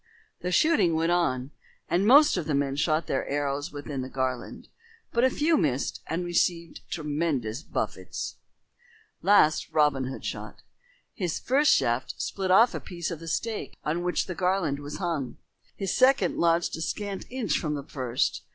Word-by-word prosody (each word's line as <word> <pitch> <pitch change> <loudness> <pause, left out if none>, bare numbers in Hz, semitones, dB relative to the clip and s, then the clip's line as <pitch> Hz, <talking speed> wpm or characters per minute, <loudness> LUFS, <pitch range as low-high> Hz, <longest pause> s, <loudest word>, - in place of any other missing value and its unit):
The 180 - -3
shooting 240 - +3
went 165 +1 +1
on, 140 -7 0 0.4
and 185 +4 +1
most 290 +5 +7
of 175 -5 -2
the 150 - +1
men 140 -1 0
shot 155 +2 +1
their - - -2
arrows 145 0 -2
within 145 -2 -5
the 130 - -6
garland, 130 -2 -3 0.4
but 235 - +1
a 260 - +6
few 310 +5 +2
missed 140 -6 -1
and 175 +2 -2
received 170 -1 0
tremendous 150 -6 -2
buffets. - - -4 0.8
Last 190 -6 +4
Robin 145 -4 +2
Hood 130 +1 -6
shot. - - -6 0.5
His 180 -5 -2
first 285 +4 +3
shaft 120 +2 +1
split 190 -1 -3
off 225 +6 +6
a - - -3
piece 170 -1 -5
of 165 - -5
the 165 - -10
stake 220 +6 -3
on 160 +3 -1
which 180 0 0
the 185 - -4
garland 180 -5 0
was 145 +1 -7
hung. 165 -8 -3 0.4
His 195 -2 -2
second 270 +2 +4
lodged 170 0 +2
a - - -6
scant 200 +3 -4
inch 235 - -1
from 150 -2 -2
the 140 - -5
first. 130 -4 -1
165 Hz, 170 wpm, -27 LUFS, 145-190 Hz, 0.8 s, most